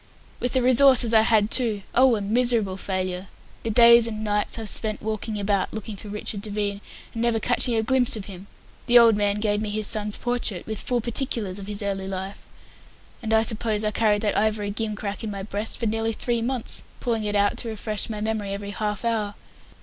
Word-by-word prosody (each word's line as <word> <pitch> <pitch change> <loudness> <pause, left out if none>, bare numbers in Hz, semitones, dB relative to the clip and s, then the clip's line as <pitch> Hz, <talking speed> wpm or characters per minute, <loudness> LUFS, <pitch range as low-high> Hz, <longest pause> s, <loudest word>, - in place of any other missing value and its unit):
"With 245 - -2
the 260 -2 +2
resources 255 -2 +5
I 220 - +7
had, 220 -1 +3
too. 220 -6 +3
Oh, 255 -1 +5
a 210 - -3
miserable 225 -2 +1
failure! 185 -1 -3 0.3
The 230 - -3
days 235 +1 +7
and 215 -1 -5
nights 210 +1 -1
I've 225 -1 -5
spent 215 +1 0
walking 215 0 -4
about 200 -1 0
looking 220 0 -6
for 210 - -10
Richard 210 0 -4
Devine, 205 -1 -3 0.3
and 230 - -4
never 235 -1 +1
catching 245 +1 +1
a 220 - +1
glimpse 255 0 +1
of 210 -3 -6
him. 195 -1 -10 0.4
The 240 0 +6
old 230 -2 +7
man 205 -1 +1
gave 210 -1 0
me 215 - -3
his 215 +1 -2
son's 210 0 +1
portrait, 240 -7 -3
with 220 -1 -4
full 245 -1 -1
particulars 225 -5 -2
of 195 - -9
his 210 0 -5
early 195 -1 -3
life, 190 +1 -6 0.7
and 225 -1 -4
I 220 0 +4
suppose 220 -1 0
I 210 - 0
carried 210 -1 +1
that 210 - 0
ivory 210 -1 0
gimcrack 210 -1 -4
in 220 - -3
my 200 -1 -5
breast 205 +2 -3
for 235 - -2
nearly 225 +1 -1
three 235 +1 -1
months, 245 0 -4 0.2
pulling 230 -3 -1
it 210 0 -2
out 205 0 +2
to 235 - -5
refresh 215 0 -3
my 210 -2 -5
memory 215 -2 -2
every 200 0 -5
half 210 +2 -3
hour. 215 -3 -1
215 Hz, 210 wpm, -24 LUFS, 205-230 Hz, 0.7 s, I